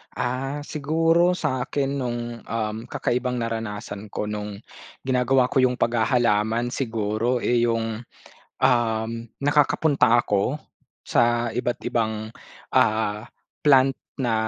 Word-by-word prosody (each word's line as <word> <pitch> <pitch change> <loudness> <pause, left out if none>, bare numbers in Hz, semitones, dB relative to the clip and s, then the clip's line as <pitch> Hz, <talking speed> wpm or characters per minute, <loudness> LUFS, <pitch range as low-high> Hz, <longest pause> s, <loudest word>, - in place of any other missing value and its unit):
Ah, 135 +4 -2
siguro 165 +4 +2
sa 150 -8 -1
akin 140 +1 -1
nung 125 -3 -2 0.2
um 110 -1 -3
kakaibang 125 +1 -2
naranasan 105 -3 -5
ko 105 - -3
nung 105 -1 -5 0.5
ginagawa 130 0 +3
ko 130 -1 +2
yung 125 0 +2
paghahalaman 115 -1 +2
siguro 115 -1 -1
eh, 120 0 +2
yung 115 0 -1 0.6
um 115 -3 +2 0.3
nakakapunta 145 -4 +3
ako 105 +6 0 0.5
sa 120 0 +2
iba't 120 +1 -2
ibang 110 -1 -2 0.4
ah, 105 0 +1 0.4
plant 135 -2 +5 0.2
na 120 -3 +1
120 Hz, 110 wpm, -24 LUFS, 110-130 Hz, 0.6 s, plant